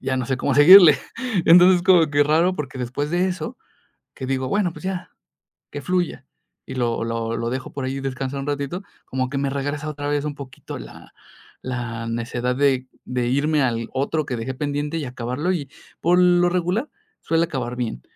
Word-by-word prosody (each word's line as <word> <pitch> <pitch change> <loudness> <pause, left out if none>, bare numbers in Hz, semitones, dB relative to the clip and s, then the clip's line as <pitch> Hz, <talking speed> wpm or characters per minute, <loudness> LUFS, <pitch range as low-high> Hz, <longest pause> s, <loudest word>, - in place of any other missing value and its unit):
Ya 130 - -1
no 130 -2 -2
sé 130 0 -1
cómo 135 +1 0
seguirle. 155 -1 +9 0.5
Entonces 180 +1 +7
como 175 -5 +5
que 145 0 +4
raro, 165 +5 +2
porque 140 -3 -5
después 130 +4 -3
de 180 +2 +1
eso 225 +7 -5 0.6
que 130 - -6
digo: 130 0 -1
"bueno, 190 -5 0
pues - - -12
ya 185 -1 -4 0.6
que 145 - -6
fluya" 175 -6 -2 0.4
y 130 - -7
lo 120 -2 -1
lo 115 0 -2
lo 115 0 -2
dejo 130 +1 -5
por 135 -2 -4
ahí 135 +1 -3
descansar 135 0 -4
un 135 - -5
ratito 145 +6 -3 0.2
como 130 -1 -2
que 140 - -3
me 140 0 0
regresa 145 +2 -3
otra 145 -1 -5
vez 145 0 0
un 150 - -3
poquito 135 -3 -9
la - - -12 0.5
la 120 -2 -4
necedad 120 +2 -2
de 135 -2 +1 0.2
de 125 -1 -2
irme 145 +4 +1
al 115 -3 0
otro 140 +3 -1
que 125 - -3
dejé 120 +4 -4
pendiente 145 +2 -2
y 150 - -3
acabarlo, 125 +7 -3
y 145 -6 -4 0.3
por 175 +2 +3
lo 175 0 +4
regular 180 - -1 0.3
suele 165 0 +1
acabar 130 -6 -4
bien, 120 - -4
140 Hz, 190 wpm, -22 LUFS, 130-165 Hz, 0.6 s, seguirle